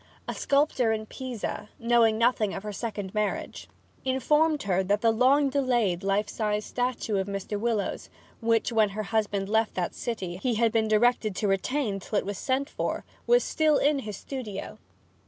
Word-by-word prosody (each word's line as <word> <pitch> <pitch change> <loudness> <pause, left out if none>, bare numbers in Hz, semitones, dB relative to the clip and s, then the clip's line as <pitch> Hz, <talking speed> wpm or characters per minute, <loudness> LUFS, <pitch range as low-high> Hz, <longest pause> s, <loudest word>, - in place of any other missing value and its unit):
A - - -2
sculptor 275 -5 +2
in 220 0 -2
Pisa, 240 -3 -5
knowing 230 -2 +3
nothing 230 -3 +2
of - - -6
her 210 -1 -5
second 205 -3 -5
marriage, 210 -1 -2 0.4
informed 295 +4 +2
her 190 -2 +1
that 205 +2 +1
the 230 - +4
long 265 +5 +4
delayed 240 -10 +1
life 200 +2 +1
size 210 0 -1
statue 245 -4 -1
of 190 0 -1
Mr. 200 +1 -4
Willowes, 225 -2 -2 0.3
which, 230 0 +1
when 220 -2 +3
her 215 - -1
husband 205 -2 -1
left 220 +1 +1
that 180 -2 -2
city, 190 -7 -4
he 235 +5 -1
had 230 0 +3
been 220 -1 +2
directed 215 -1 +2
to 205 - 0
retain 200 +2 0
till 205 +3 -3
it - - 0
was 200 0 -4
sent 265 +1 0
for, - - -3 0.2
was 485 +1 +5
still 310 -2 +2
in 290 0 +2
his 210 -6 -6
studio. 230 -8 -6
220 Hz, 175 wpm, -27 LUFS, 205-255 Hz, 0.4 s, was